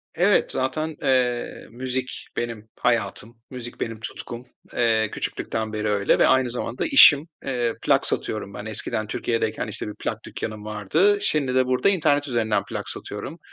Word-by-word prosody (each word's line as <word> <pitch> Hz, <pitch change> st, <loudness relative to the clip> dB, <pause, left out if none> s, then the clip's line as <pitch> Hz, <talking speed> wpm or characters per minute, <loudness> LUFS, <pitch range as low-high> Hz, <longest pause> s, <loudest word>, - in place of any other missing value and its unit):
Evet. 180 Hz, +5 st, +3 dB
Zaten, 155 Hz, +5 st, -2 dB
eee, 125 Hz, -2 st, 0 dB
müzik 130 Hz, +1 st, -3 dB
benim 115 Hz, -2 st, -4 dB
hayatım. 115 Hz, -1 st, -1 dB
Müzik 120 Hz, -2 st, -7 dB
benim 115 Hz, -1 st, -3 dB
tutkum. 120 Hz, +2 st, -6 dB, 0.3 s
Eee, 110 Hz, -2 st, +2 dB
küçüklükten 110 Hz, -1 st, -3 dB
beri 110 Hz, 0 st, -1 dB
öyle 100 Hz, -1 st, +2 dB
ve -, -, +6 dB
aynı 130 Hz, -1 st, +4 dB
zamanda 120 Hz, 0 st, -3 dB
işim. 160 Hz, -, +8 dB, 0.2 s
Eee, 120 Hz, -4 st, 0 dB
plak -, -, +3 dB
satıyorum -, -, -2 dB
ben. -, -, -7 dB
Eskiden 110 Hz, -1 st, -2 dB
Türkiye'deyken 115 Hz, +1 st, -1 dB
işte -, -, -5 dB
bir 105 Hz, -, -6 dB
plak -, -, -3 dB
dükkânım 110 Hz, -1 st, -6 dB
vardı. 130 Hz, -, +2 dB
Şimdi 140 Hz, -9 st, 0 dB
de 130 Hz, 0 st, +4 dB
burada 130 Hz, +9 st, +2 dB
internet 150 Hz, -6 st, +2 dB
üzerinden 115 Hz, -4 st, +1 dB
plak -, -, -4 dB
satıyorum. -, -, -6 dB
120 Hz, 155 wpm, -24 LUFS, 110-135 Hz, 0.3 s, işim